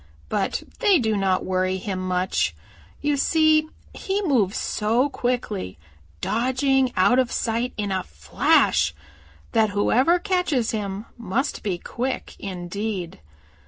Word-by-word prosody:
But 195 - -1 0.2
they 410 -6 +5
do 220 -6 +1
not 190 -2 +1
worry 185 0 0
him 190 0 -4
much. 185 - 0 0.5
You 295 -1 +1
see 310 +1 +3 0.2
he 400 +1 -2
moves 230 - +2
so 230 +6 +1
quickly, 240 - -2 0.4
dodging 260 +3 +1
out 245 +7 +5
of 255 -2 +1
sight 235 +2 -1
in 205 -2 -2
a 190 -1 0
flash, 75 0 +2 0.6
that 220 -1 +3
whoever 260 +11 +4
catches 360 - 0
him 205 -1 -4
must 235 +6 -2
be 190 -4 -2
quick 250 +8 -4
indeed. 185 0 -4
220 Hz, 125 wpm, -24 LUFS, 190-265 Hz, 0.6 s, they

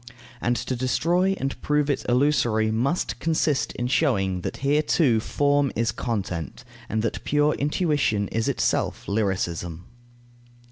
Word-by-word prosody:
And 120 +1 +1
to 130 +3 -3
destroy 170 +9 +1
and 135 0 -4
prove 150 -1 +1
it 140 - -1
illusory 120 -5 +2
must 130 +10 -1
consist 155 -3 0
in 120 - -3
showing 120 - +1
that - - -4
here 145 +2 +3
too 140 -7 +2
form 145 +3 +1
is 115 0 +1
content, 105 -4 -4 0.3
and 110 0 -1
that 115 - -2
pure 150 +1 +2
intuition 145 - 0
is 115 0 -1
itself - - -1
lyricism. 90 -4 -2
125 Hz, 135 wpm, -24 LUFS, 110-145 Hz, 0.3 s, here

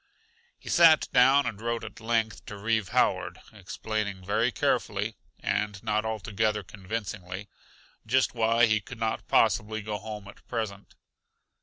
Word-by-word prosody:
He - - -18
sat 165 -2 +6
down 135 +3 +6
and 105 -1 -4
wrote 115 0 -2
at - - -9
length 115 -1 -1
to 105 - -7
Reeve 110 0 0
Howard, - - +1
explaining 100 -4 -4
very 110 +5 +1
carefully - - 0 0.3
and 105 -1 -1
not 110 0 0
altogether 105 -1 -1
convincingly 100 -1 -6 0.6
just 130 +3 +2
why 115 0 +4
he 110 -2 +2
could 125 +4 -10
not 110 -1 -2
possibly 110 +1 +2
go 105 -1 -3
home 105 -2 -7
at 100 - -14
present. 105 -4 -5
110 Hz, 140 wpm, -28 LUFS, 105-115 Hz, 0.6 s, sat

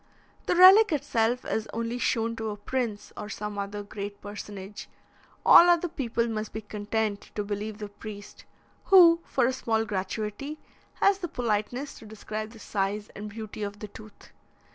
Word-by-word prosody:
The - - +2
relic 380 +4 +8
itself 250 -5 0
is 220 0 -2
only 230 +2 -3
shown 230 -1 0
to 220 -1 -3
a 210 - -5
prince 225 -1 -3
or 210 - -7
some 210 0 -5
other 205 +1 -4
great 200 0 -7
personage; 205 -1 -8 0.6
all 350 - +9
other 345 0 +3
people 240 -7 -1
must 215 -1 -4
be 220 - -4
content 210 0 -3
to 210 - -1
believe 205 +1 -4
the 210 -1 -6
priest, 205 0 -10 0.4
who, 340 -3 +7
for 255 - +1
a 260 - +1
small 225 -3 0
gratuity, 210 +8 -4 0.4
has 395 -1 +3
the 350 - -3
politeness 245 +1 -2
to 220 - -12
describe 215 0 -6
the 225 - -14
size 205 0 -2
and 210 +1 -6
beauty 215 0 -8
of 205 0 -4
the 210 0 -8
tooth. 215 +1 -14
215 Hz, 165 wpm, -27 LUFS, 205-245 Hz, 0.6 s, all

